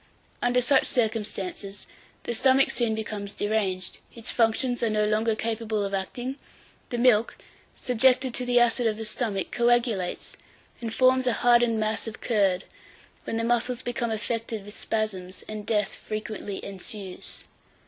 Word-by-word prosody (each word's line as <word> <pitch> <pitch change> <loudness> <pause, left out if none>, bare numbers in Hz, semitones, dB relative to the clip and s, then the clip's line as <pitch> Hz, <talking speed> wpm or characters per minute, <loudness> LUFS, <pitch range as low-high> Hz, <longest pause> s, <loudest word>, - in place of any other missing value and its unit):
Under 245 +1 +3
such 265 +2 +4
circumstances, 210 -4 -2 0.4
the 240 - -2
stomach 265 +3 +4
soon 235 -2 +1
becomes 210 -2 -5
deranged; 200 -4 -1 0.2
its 230 -2 -1
functions 245 +2 +2
are 230 - +2
no 215 0 +2
longer 215 +1 +1
capable 220 -2 -1
of 200 - -4
acting; 245 +8 -3 0.5
the 240 - -2
milk, 235 -2 +3 0.4
subjected 255 +1 +3
to 250 - +1
the 245 0 +4
acid 240 0 +3
of 215 -1 0
the 225 - -4
stomach, 215 -4 -2
coagulates, 235 -6 +1 0.5
and 230 -1 -3
forms 255 +2 +3
a 245 - +3
hardened 240 -2 +5
mass 215 +1 -1
of 220 - -6
curd, 195 -5 +2 0.6
when 225 - -2
the 230 - 0
muscles 240 +1 0
become 240 -1 -2
affected 225 -1 -3
with 205 - -10
spasms, 190 -4 -3
and 215 -1 -6
death 210 -3 +1
frequently 215 -2 -5
ensues. 195 -1 -7
225 Hz, 150 wpm, -26 LUFS, 210-240 Hz, 0.6 s, hardened